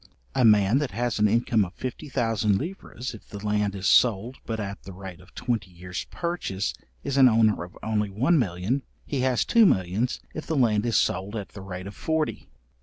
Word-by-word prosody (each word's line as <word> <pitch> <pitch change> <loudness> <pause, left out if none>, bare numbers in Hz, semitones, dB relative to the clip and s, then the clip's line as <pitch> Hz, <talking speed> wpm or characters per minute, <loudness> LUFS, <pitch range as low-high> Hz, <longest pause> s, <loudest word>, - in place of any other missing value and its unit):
A 130 - +2
man 105 +2 +5
that 145 -3 -1
has 120 -2 0
an 105 - +5
income 115 0 +2
of 90 -1 -7
fifty 130 +4 -6
thousand 110 -5 +1
livres, 140 - -5
if 110 - -12
the 100 - -7
land 105 -1 +1
is 95 -1 -5
sold 120 +2 +4
but 110 -1 -2
at 100 -1 -5
the 95 - -10
rate 95 -2 -9
of 90 +1 -19
twenty 115 -7 -2
years 90 +1 -6
purchase 170 - -2 0.3
is 140 -1 -2
an 130 -2 +8
owner 110 -5 +3
of 85 - -11
only 105 -2 0
one 130 - +2
million; 100 +5 0 0.2
he 140 - -2
has 125 -2 +2
two 230 -1 +5
millions, 95 - +1
if 155 - -6
the 160 - 0
land 115 -3 +3
is 115 - +2
sold 100 0 0
at 105 -3 -4
the 100 - -10
rate 95 -1 -7
of 100 - -7
forty. 160 -1 -2
110 Hz, 205 wpm, -26 LUFS, 95-125 Hz, 0.3 s, an